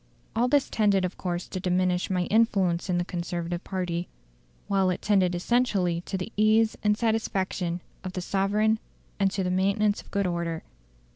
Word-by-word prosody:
"All 235 +2 +3
this 285 +1 +3
tended 200 -4 +2
of 180 - -4
course 175 -1 -3
to 185 - -5
diminish 180 0 +1
my 180 -2 +1
influence 195 -5 +2
in 180 - +2
the 175 - 0
Conservative 175 0 -3
party, 180 -2 -3 0.6
while 195 -2 +2
it 180 - -1
tended 190 -4 +2
essentially 185 -4 +1
to 195 - -2
the 185 +5 -6
ease 215 +1 +4
and 210 0 +3
satisfaction 195 -6 -1 0.2
of 185 -1 -5
the 185 - -3
sovereign, 205 +4 +1 0.4
and 195 -1 +3
to 190 0 -2
the 180 - 0
maintenance 200 +3 +2
of - - -20
good 200 -1 0
order. 170 -2 -2
190 Hz, 170 wpm, -27 LUFS, 180-210 Hz, 0.6 s, ease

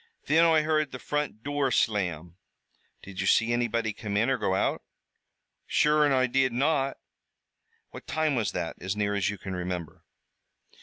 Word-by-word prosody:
"Thin 160 +3 +4
Oi 160 -2 +4
heard 155 -2 0
the 130 - -6
front 145 -5 -3
dure 145 -1 0
slam." 90 -8 -1 0.7
"Did 95 0 -6
you 95 - -1
see 115 +3 +3
anybody 115 -2 0
come 105 -1 -4
in 115 +5 +2
or 130 - +1
go 95 -3 0
out?" - - 0 0.9
"Sure, 150 0 +3
an' 145 - +3
Oi 130 -1 +3
did 130 0 +1
not." 135 +2 0 0.9
"What - - -11
time 155 0 0
was 110 -8 0
this, 80 - -3
as 95 +3 -3
near 105 -1 0
as 100 -1 0
you 105 - -4
can 95 0 -7
remember?" 90 -3 -5
120 Hz, 170 wpm, -27 LUFS, 100-145 Hz, 0.9 s, Thin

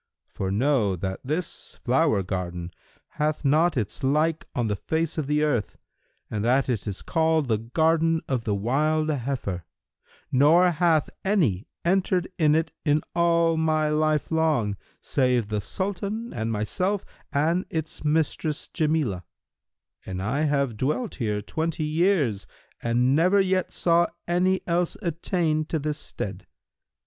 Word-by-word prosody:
For 95 - -4
know 110 -2 +2
that 95 +2 -4
this 155 +6 -4
flower 130 -5 +2
garden 90 -2 -4 0.5
hath 150 0 0
not 155 +3 +3
its 105 +4 -3
like 155 +4 +1
on 120 - +1
the 105 -2 0
face 160 +9 -1
of 145 - -2
the 150 +1 +2
earth 120 -9 0 0.5
and 105 -1 -3
that 125 +3 +3
it 115 -5 -2
is 100 -2 -4
called 160 -2 +1
the 110 -3 +1
Garden 160 +7 +2
of 130 -4 -1
the 105 -2 0
Wild 155 +9 +1
Heifer,[FN#316] 125 - -2 0.7
nor 165 +7 +5
hath 165 -2 +2
any 155 - +1 0.2
entered 185 0 +2
it 155 +1 +3
in 150 -1 +2
all 170 -1 +3
my 155 -1 +2
life 155 0 +1
long, 155 -11 +1 0.3
save 125 -5 +1
the 105 -1 -1
Sultan 200 - -3
and 110 0 -2
myself 180 - -1 0.3
and 165 +6 +1
its 160 -1 -4
mistress 150 0 0
Jamilah; 150 - 0 0.8
and 95 -1 -5
I 130 +11 0
have 140 -6 0
dwelt 150 - -1
here 105 -2 -1
twenty 160 +6 -2
years 155 - +1 0.3
and 125 +3 +2
never 180 +6 +4
yet 190 -1 +1
saw 170 0 +3 0.2
any 185 +2 +2
else 170 0 0
attain 165 -2 0
to 160 - -2
this 150 0 -3
stead. 95 -7 -6
150 Hz, 140 wpm, -25 LUFS, 115-165 Hz, 0.8 s, nor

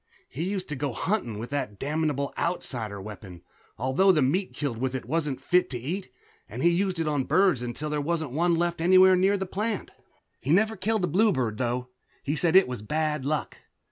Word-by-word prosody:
He 155 +7 -4
used 195 -2 -3
to 150 - -3
go 140 -1 -2
hunting 120 - -2
with 115 +4 -7
the 145 -5 -1
damnable 145 0 -1
Outsider 120 - -2
weapon, 95 -3 -10 0.3
although 130 - +3
the 155 -6 +3
meat 180 +9 0
killed 135 -6 -3
with 130 +1 -1
it 130 - -4
wasn't 150 0 -1
fit 180 0 +2
to 125 - -3
eat, 170 +11 -4 0.4
and - - -5
he 170 - +5
used 185 +1 0
it 165 - 0
on 145 -3 0
birds 185 -10 +3
until 125 +5 -4
there 150 -1 0
wasn't 160 -2 -2
one 170 +5 +2
left 170 0 -1
anywhere 185 +2 +6
near 190 +2 +3
the 190 - -3
plant. 210 +3 -3 0.5
He 130 - -7
never 215 +7 +3
killed 210 +1 -1
a - - +2
bluebird, 165 - +1
though. 125 0 -2 0.3
He 145 - -1
said 165 +2 +2
it 190 - +7
was 125 -4 -5
bad 150 +3 -1
luck. 150 +1 -2
155 Hz, 205 wpm, -27 LUFS, 130-185 Hz, 0.5 s, it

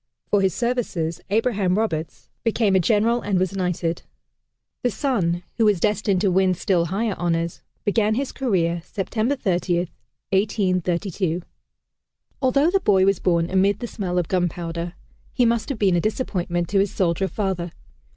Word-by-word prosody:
For 205 - +4
his 190 -3 +1
services, 230 -10 -1
Abraham 205 -3 +1
Roberts 165 -8 -2 0.2
became 220 -3 +2
a - - +5
general 225 +5 +2
and 200 -2 0
was 185 +1 0
knighted. 180 -3 -1 0.8
The 245 - +2
son, 190 -10 0
who 225 - +3
was 205 -4 +3
destined 205 -1 +1
to 200 -2 +2
win 185 0 +3
still 175 -1 +1
higher 200 +5 -1
honors, 170 -1 -1 0.2
began 215 +1 +2
his 275 +2 -2
career, 175 -10 0
September 215 +8 -1
30, 180 -6 0 0.4
1832. 185 -3 0 1.0
Although 275 +5 +3
the 390 - +3
boy 190 - +4
was 195 -1 +2
born 170 -2 +2
amid 195 +1 +3
the - - -4
smell 190 -6 -3
of 175 -3 +1
gunpowder, 175 -1 -2 0.4
he 245 - +3
must 230 +2 +1
have 275 - -2
been 195 -4 +3
a 170 - +2
disappointment 175 -6 -1
to 200 - +2
his 200 +1 +2
soldier 185 +1 0
father. 185 -2 -2
190 Hz, 155 wpm, -23 LUFS, 175-215 Hz, 1.0 s, a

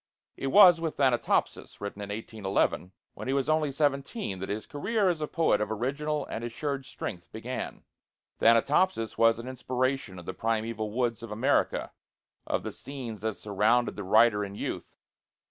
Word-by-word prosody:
It 135 - -4
was 180 +1 +8
with 160 -2 -3
'Thanatopsis,' 130 -4 +1
written 100 0 -6
in 100 - -6
1811, 100 -4 -1 0.2
when - - -8
he 135 - +1
was 140 -1 0
only 155 -2 +2
seventeen, 140 - -1
that 95 - -5
his 105 +1 -3
career 200 +7 0
as 165 -3 -1
a 150 - -1
poet 165 -11 +2
of 105 - -1
original 140 +6 -2
and 115 - -5
assured 135 +3 -3
strength 90 -9 -6
began. 120 +4 -5 0.6
'Thanatopsis' 115 +2 +3
was 115 -1 +5
an 115 +2 -7
inspiration 130 -4 -2
of 85 - -10
the 95 - -4
primeval 110 +1 -2
woods 120 0 -1
of 115 - -7
America, 105 +2 +1 0.6
of - - -1
the - - -4
scenes 125 -7 -7
that 110 -1 -2
surrounded 110 +4 +1
the 100 - -5
writer 105 +2 +4
in 100 0 -6
youth. - - -5
120 Hz, 165 wpm, -28 LUFS, 105-140 Hz, 0.6 s, was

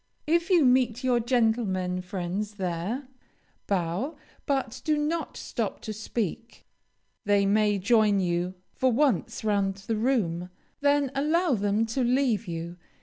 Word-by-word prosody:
If 335 +3 +1
you 345 -6 +5
meet 250 -2 +3
your 250 -2 +3
gentlemen 220 -7 +1
friends 190 +3 -4
there, 190 +8 -3 0.6
bow, 195 - -1 0.3
but 270 -5 -1
do 305 -1 +1
not 315 +3 -2
stop - - -3
to 215 - -5
speak. 220 +1 -4 0.6
They 200 -1 +3
may 210 0 +3
join 210 0 +3
you 175 0 -1 0.2
for 260 -1 +2
once 245 - +1
round 200 -2 +1
the 205 +3 -3
room, 195 -8 0 0.3
then 285 -2 +2
allow 310 +4 +2
them 205 0 +1
to 230 +3 -1
leave 240 -4 +1
you. 170 +1 -5
220 Hz, 135 wpm, -27 LUFS, 195-260 Hz, 0.6 s, you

